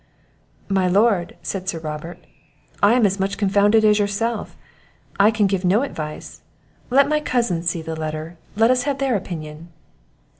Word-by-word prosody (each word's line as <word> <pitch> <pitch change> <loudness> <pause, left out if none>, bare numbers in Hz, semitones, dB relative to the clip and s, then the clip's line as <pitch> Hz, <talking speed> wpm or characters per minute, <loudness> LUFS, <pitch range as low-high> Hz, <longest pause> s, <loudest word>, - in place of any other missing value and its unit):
"My 190 -2 +1
Lord," 195 -1 +2
said 190 -1 -4
Sir 170 - -3
Robert, 155 +2 -6 0.6
"I 205 +3 +5
am 245 -3 +4
as 195 0 0
much 195 +1 -1
confounded 205 +2 +3
as 210 0 +4
yourself 210 +2 -2 0.6
I 200 +2 +6
can 215 -2 +1
give 195 -1 0
no 195 +7 +3
advice 155 - -7 0.5
let 275 +3 +4
my 305 +1 +1
cousins 215 - 0
see 165 -1 -4
the 160 0 -5
letter 155 +1 -5 0.2
let 225 +3 +4
us 255 -1 +2
have 275 - -1
their 270 -3 0
opinion." 165 -4 -6
195 Hz, 160 wpm, -21 LUFS, 170-225 Hz, 0.6 s, I